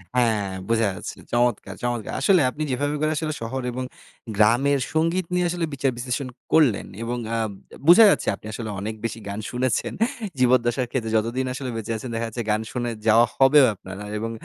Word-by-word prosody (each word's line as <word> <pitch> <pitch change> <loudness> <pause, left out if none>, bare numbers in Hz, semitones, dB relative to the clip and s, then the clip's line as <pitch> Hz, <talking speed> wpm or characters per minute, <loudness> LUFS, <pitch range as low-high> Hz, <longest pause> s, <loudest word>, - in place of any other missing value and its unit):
হ্যাঁ, 110 -5 +2 0.2
বোঝা 115 -2 +3
যাচ্ছে - - -7 0.2
চমৎকার, 120 -5 +1
চমৎকার! 120 -3 -2
আসলে 185 +3 +5
আপনি 150 +4 -4
যেভাবে 145 +3 -1
করে 155 0 +1 0.3
শহর 130 +4 -3
এবং 130 +1 -4 0.5
গ্রামের 130 +6 +4
সংগীত 165 +3 +1
নিয়ে 180 0 +2
আসলে 170 -1 -1
বিচার 135 -1 0
বিশ্লেষণ 125 +2 -3 0.3
করলেন, 145 -10 +4 0.2
এবং 120 +1 -2 0.2
আ - - 0 0.5
বোঝা 180 +7 +9
যাচ্ছে - - +1
আপনি - - -18
আসলে 110 -1 -5
অনেক 110 +2 -4
বেশি 115 0 -3
গান 100 - -4
শুনেছেন। 125 -1 -1 0.5
জীবদ্দশার 125 0 +3
ক্ষেত্রে 115 -4 -2
যতদিন 120 +4 -1
আসলে 130 0 -5
বেঁচে 115 0 -4
আছেন, 120 +3 -7
দেখা 115 - -1
যাচ্ছে 115 +2 -5
গান 105 - +1
শুনে 120 -1 -2 0.2
যাওয়া 115 +2 +6
হবেও 135 +1 +7
আপনার, 95 0 -10 0.2
এবং 115 +1 -3
120 Hz, 175 wpm, -24 LUFS, 115-135 Hz, 0.5 s, বোঝা